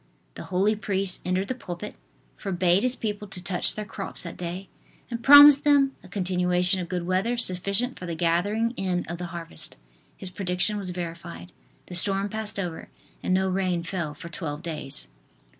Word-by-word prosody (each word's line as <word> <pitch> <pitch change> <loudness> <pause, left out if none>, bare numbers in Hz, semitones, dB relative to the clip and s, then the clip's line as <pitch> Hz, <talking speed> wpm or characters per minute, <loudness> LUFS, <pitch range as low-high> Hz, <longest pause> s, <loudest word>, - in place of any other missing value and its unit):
The - - -9
holy 195 +4 +1
priest 195 -3 -2
entered 185 +2 -1
the - - -1
pulpit, 180 -8 -7 0.4
forbade 180 0 +1
his 255 +1 +2
people 210 -3 -4
to 180 -2 -7
touch 180 -1 +1
their 215 - -4
crops 200 -2 -7
that 170 - -7
day, 180 +2 -6 0.4
and 235 0 -4
promised 285 0 +10
them 280 -2 +4
a - - -14
continuation 180 -1 +1
of 175 -2 -5
good 180 -2 -2
weather 190 +7 0
sufficient 200 +4 +2
for 180 - -7
the 170 - -3
gathering 180 +7 +1
in 180 -2 -1
of 170 +1 -6
the 180 - -4
harvest. 170 - -8 0.4
His 185 - -7
prediction 185 +2 -1
was 200 -3 -4
verified; 175 0 -7 0.3
the - - -10
storm 195 +3 +3
passed 215 0 -4
over 175 -4 -5 0.3
and - - -2
no 190 +1 +2
rain 185 -2 0
fell 170 -4 -3
for 160 +4 -9
twelve 155 -2 -6
days. 150 - -3
185 Hz, 175 wpm, -26 LUFS, 175-205 Hz, 0.4 s, promised